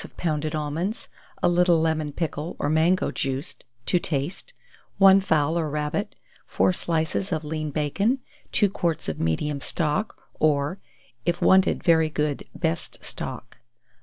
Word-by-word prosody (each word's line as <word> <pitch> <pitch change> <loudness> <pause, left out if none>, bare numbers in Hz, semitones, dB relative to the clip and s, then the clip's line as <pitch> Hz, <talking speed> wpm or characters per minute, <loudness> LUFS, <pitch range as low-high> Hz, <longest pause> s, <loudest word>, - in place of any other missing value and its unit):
of - - -13
pounded 155 -2 -1
almonds, 155 +8 -3 0.3
a - - +5
little 175 -1 +4
lemon 160 -2 0
pickle, 155 +1 -3
or 145 - -1
mango 165 +4 +3
juice, 135 0 -2 0.3
to 180 - +3
taste; 170 - -2 0.5
1 195 0 +7
fowl 160 -2 +2
or 155 -2 -1
rabbit, 150 +8 -2 0.3
4 185 - +2
slices 165 +3 -1
of 160 -2 -1
lean 155 0 -3
bacon; 165 - +1 0.3
2 205 - +4
quarts 170 -4 -2
of 80 - -3
medium 140 - -1
stock, 170 +9 -1 0.2
or, 150 +4 +1 0.4
if 175 0 0
wanted 190 0 +4
very 160 -2 +4
good, 150 -2 -1
best 165 -1 -2
stock. - - -6
160 Hz, 140 wpm, -25 LUFS, 150-180 Hz, 0.5 s, 1